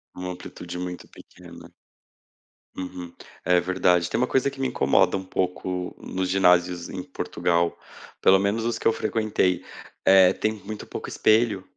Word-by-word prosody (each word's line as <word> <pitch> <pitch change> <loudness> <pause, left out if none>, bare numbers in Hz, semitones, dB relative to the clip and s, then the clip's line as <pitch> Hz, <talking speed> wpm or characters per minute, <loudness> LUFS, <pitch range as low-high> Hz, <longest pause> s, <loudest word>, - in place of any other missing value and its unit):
Uma 90 0 -5
amplitude 90 0 -8
muito 90 -1 -6
pequena. - - -15 1.1
Uhum. 90 -2 -7 0.3
É 90 +1 +4
verdade. 90 -1 +1
Tem - - -1
uma 125 - +2
coisa 135 +1 +1
que 135 0 -13
me 130 - +1
incomoda 70 - +2
um 95 - -6
pouco 90 -1 -3
nos 95 0 -3
ginásios 90 -2 +3
em 90 - -5
Portugal, 85 -1 -1 0.4
pelo 95 0 +6
menos 100 +3 0
os 115 -1 -1
que - - -1
eu 115 - +4
frequentei, 100 -5 0 0.4
eh, 95 -1 +7
tem 110 0 -1
muito 105 +1 -8
pouco - - -7
espelho. 110 -3 +2
95 Hz, 155 wpm, -24 LUFS, 90-105 Hz, 1.1 s, eh